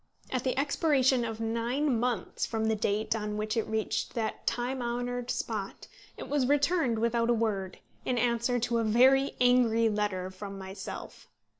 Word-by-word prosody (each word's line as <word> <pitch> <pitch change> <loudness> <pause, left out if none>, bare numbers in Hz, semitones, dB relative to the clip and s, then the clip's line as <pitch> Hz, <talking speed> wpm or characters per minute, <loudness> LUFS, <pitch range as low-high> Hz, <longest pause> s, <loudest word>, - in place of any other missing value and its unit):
At 255 -2 -1
the 260 0 -1
expiration 275 -3 +2
of 225 -1 -4
nine 235 +4 0
months 240 -5 -2
from 220 -1 -1
the 220 0 +2
date 215 +1 0
on 210 -1 -3
which 215 0 -2
it 225 - 0
reached 220 -1 -2
that 225 -2 -3
time 250 +2 -1
honoured 245 +1 -3
spot - - -3 0.3
it - - -7
was 280 -3 +1
returned 285 -3 +2
without 235 +1 +1
a 240 - +4
word, 200 -5 -1 0.3
in 250 - -1
answer 235 +1 +1
to 235 0 +1
a - - +1
very 260 +5 +4
angry 240 -2 +4
letter 205 -3 -1
from 195 +1 -8
myself. 190 +1 -8
235 Hz, 165 wpm, -29 LUFS, 220-250 Hz, 0.3 s, a